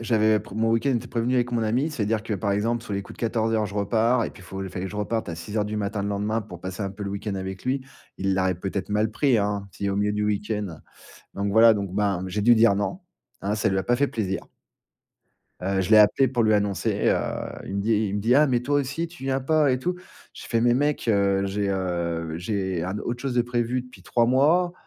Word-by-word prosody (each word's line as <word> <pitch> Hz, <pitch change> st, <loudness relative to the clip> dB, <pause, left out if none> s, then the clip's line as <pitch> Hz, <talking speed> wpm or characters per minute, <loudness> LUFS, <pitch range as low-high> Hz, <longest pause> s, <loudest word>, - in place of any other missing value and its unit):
j'avais 110 Hz, -2 st, +3 dB
p -, -, -14 dB
mon 115 Hz, +1 st, +1 dB
week-end 115 Hz, +5 st, +2 dB
était 120 Hz, -3 st, -1 dB
prévenu 120 Hz, +2 st, -1 dB
avec 125 Hz, -1 st, +1 dB
mon 115 Hz, -1 st, +1 dB
ami, 125 Hz, +8 st, +1 dB
c'est-à-dire 110 Hz, -5 st, -1 dB
que, 110 Hz, -1 st, -3 dB
par 100 Hz, +1 st, -1 dB
exemple, 115 Hz, +4 st, 0 dB
sur 105 Hz, -, -7 dB
les 100 Hz, -, -1 dB
coups -, -, -12 dB
de -, -, -14 dB
14:00, 110 Hz, -2 st, +1 dB
je 100 Hz, -, -9 dB
repars 110 Hz, +4 st, +2 dB
et -, -, -4 dB
puis, -, -, -15 dB
il -, -, -14 dB
faut 95 Hz, +2 st, -6 dB
il 95 Hz, -, -5 dB
fallait 95 Hz, +1 st, -4 dB
que 95 Hz, -, -7 dB
je 105 Hz, -, -7 dB
reparte 110 Hz, 0 st, -2 dB
à 85 Hz, -, -3 dB
6:00 105 Hz, +6 st, -2 dB
du 105 Hz, +1 st, -4 dB
matin, 105 Hz, 0 st, -2 dB
le 100 Hz, -, -2 dB
lendemain, 105 Hz, +2 st, -1 dB
pour 90 Hz, -5 st, -10 dB
passer 95 Hz, +3 st, -5 dB
un 95 Hz, -, -2 dB
peu 100 Hz, +1 st, -7 dB
le 100 Hz, -, -3 dB
week-end 100 Hz, 0 st, -4 dB
avec 95 Hz, 0 st, -6 dB
lui. 130 Hz, +1 st, 0 dB, 0.4 s
Il 95 Hz, 0 st, +1 dB
l'aurait, 95 Hz, -1 st, +1 dB
peut-être, 95 Hz, +1 st, -4 dB
mal 105 Hz, +1 st, +1 dB
pris, 130 Hz, +1 st, +2 dB
hein, 100 Hz, -1 st, -1 dB
s'il 100 Hz, -, -4 dB
est -, -, +1 dB
au 100 Hz, -, -1 dB
milieu 105 Hz, 0 st, +1 dB
du 105 Hz, 0 st, -1 dB
week-end. 105 Hz, -4 st, -2 dB, 0.5 s
Donc 100 Hz, 0 st, -2 dB
voilà, 110 Hz, +2 st, +7 dB
donc, 100 Hz, -3 st, -3 dB
ben, 100 Hz, -3 st, 0 dB
j'ai 105 Hz, +3 st, -2 dB
dû 120 Hz, +3 st, +6 dB
dire 110 Hz, -2 st, +5 dB
non, 105 Hz, -, -2 dB, 0.4 s
hein, 100 Hz, +2 st, -1 dB
ça 110 Hz, -, +1 dB
lui 95 Hz, -, 0 dB
a -, -, -3 dB
pas 120 Hz, -, +2 dB
fait 140 Hz, +3 st, +2 dB
plaisir. 100 Hz, -6 st, -2 dB, 1.2 s
Heu, 95 Hz, +1 st, 0 dB
je 95 Hz, -, -4 dB
l'ai 110 Hz, -, +8 dB
appelé 105 Hz, +6 st, +5 dB
pour 120 Hz, -2 st, +1 dB
lui 110 Hz, -1 st, +4 dB
annoncer, 100 Hz, -2 st, 0 dB
heu, -, -, +3 dB, 0.5 s
il 100 Hz, -, -4 dB
me 100 Hz, -, 0 dB
dit 110 Hz, +3 st, +1 dB, 0.2 s
il 100 Hz, -, -2 dB
me -, -, -1 dB
dit: 115 Hz, +5 st, +3 dB
«Ah, 150 Hz, +2 st, +6 dB
mais 125 Hz, -3 st, +1 dB
toi 140 Hz, +4 st, 0 dB
aussi 145 Hz, +5 st, -3 dB
tu 165 Hz, -5 st, -11 dB
viens 135 Hz, 0 st, 0 dB
pas 150 Hz, +1 st, +3 dB
et 130 Hz, -, 0 dB
tout». 180 Hz, +8 st, -1 dB, 0.4 s
Je -, -, -10 dB
fais: 115 Hz, -, +1 dB
«Mais 120 Hz, +1 st, +4 dB
mec, 145 Hz, -1 st, 0 dB
heu, 100 Hz, -2 st, +2 dB
j'ai, 100 Hz, +1 st, -1 dB
heu, 85 Hz, -4 st, -2 dB
j'ai 95 Hz, -1 st, -2 dB
un 95 Hz, +4 st, -3 dB
autre 120 Hz, +3 st, -4 dB
chose 135 Hz, -2 st, -2 dB
de 120 Hz, -, +3 dB
prévu 120 Hz, +1 st, -1 dB
depuis 125 Hz, 0 st, -16 dB
3 120 Hz, -1 st, +2 dB
mois, 155 Hz, +8 st, +3 dB
105 Hz, 265 wpm, -25 LUFS, 100-120 Hz, 1.2 s, l'ai